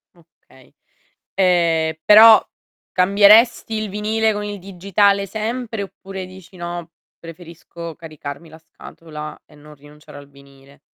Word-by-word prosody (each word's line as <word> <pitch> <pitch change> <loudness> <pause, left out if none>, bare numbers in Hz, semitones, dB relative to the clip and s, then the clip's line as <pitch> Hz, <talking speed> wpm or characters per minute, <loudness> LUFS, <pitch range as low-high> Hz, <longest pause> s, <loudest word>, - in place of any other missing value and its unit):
Okay. 165 -6 -24 0.6
Ehm, 170 -4 +1
però 220 +1 +8 0.5
cambieresti 210 +5 +4
il 215 -1 -3
vinile 215 +2 -1
con 205 0 -5
il 205 0 -6
digitale 195 +2 0
sempre, 225 +1 -5
oppure 195 -1 -9
dici: 185 0 -15
"No, 175 -1 -7 0.3
preferisco 170 0 -11
caricarmi 155 -1 -10
la 160 0 -15
scatola 155 -1 -11
e - - -23
non 150 +1 -16
rinunciare 145 +1 -16
al 140 0 -15
vinile?" 140 0 -20
180 Hz, 120 wpm, -19 LUFS, 160-205 Hz, 0.6 s, però